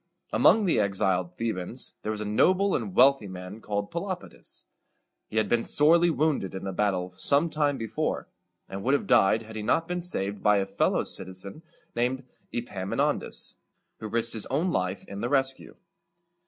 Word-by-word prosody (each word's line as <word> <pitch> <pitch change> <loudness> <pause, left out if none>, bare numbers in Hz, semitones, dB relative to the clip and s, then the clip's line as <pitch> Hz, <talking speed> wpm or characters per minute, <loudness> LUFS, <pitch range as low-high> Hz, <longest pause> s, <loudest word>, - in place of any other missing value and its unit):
Among 220 -2 +5
the 170 - +2
exiled 95 -3 0
Thebans 110 -6 -3
there 110 - -2
was 105 -1 -4
a - - -3
noble 185 - +3
and 190 - -3
wealthy 135 -4 +5
man 95 +3 -8
called 105 -1 -3
Pe 170 - -2
lop´i 185 -1 -5
das. - - -16 0.6
He 110 - -5
had 110 -1 +2
been 115 +2 +1
sorely 170 +4 +4
wounded 145 - 0
in 95 - -6
a 95 - -3
battle 90 -2 0
some 140 - +1
time 145 -3 +1
before, 115 -3 -2 0.4
and 95 +1 -6
would 130 +7 +2
have - - -1
died 110 +4 +4
had 110 0 -11
he 110 - -3
not 145 +10 +1
been 180 0 -2
saved 100 - 0
by 105 -1 +4
a 100 - +1
fellow - - +1
citizen 95 - -6 0.3
named 125 +3 0 0.3
E 120 - -2
pam 95 -5 -6
i - - -1
non´das, - - -1 0.4
who 110 - -5
risked 115 +1 -1
his 110 - -2
own 160 +7 0
life 90 - -2
in 100 0 -7
the 120 - -1
rescue. 135 -1 0
110 Hz, 190 wpm, -27 LUFS, 100-145 Hz, 0.6 s, Among